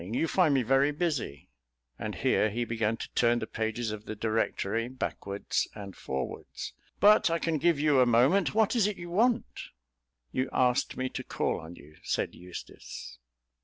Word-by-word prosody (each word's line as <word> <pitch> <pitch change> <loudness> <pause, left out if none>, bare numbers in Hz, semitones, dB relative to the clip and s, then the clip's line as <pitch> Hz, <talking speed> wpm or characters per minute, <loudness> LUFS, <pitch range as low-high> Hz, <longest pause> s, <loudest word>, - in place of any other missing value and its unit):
You 115 - -1
find 160 -6 +3
me 130 - +3
very 135 +4 +4
busy," 150 - -3 0.5
and - - -4
here 110 - +2
he 120 +3 -2
began 115 -1 0
to - - -8
turn 120 0 +3
the 115 - -2
pages 110 +1 -2
of 110 0 -7
the 110 - -5
Directory 110 0 -1
backwards 100 -5 -2
and 100 -3 -8
forwards, 65 -1 -5 0.3
"but 210 -2 +6
I 165 - +1
can 165 -2 -1
give 170 -1 +3
you 150 -2 +4
a 125 - +5
moment. 130 - +4
What 220 +2 +3
is 220 -4 +4
it 210 - -3
you 175 -1 -8
want?" 235 +5 +1 0.6
"You 130 - -1
asked 125 -1 +1
me 130 - -1
to - - -5
call - - -1
on 80 +2 -10
you," 75 0 -16
said - - -1
Eustace. 90 0 -9
125 Hz, 175 wpm, -29 LUFS, 110-165 Hz, 0.6 s, but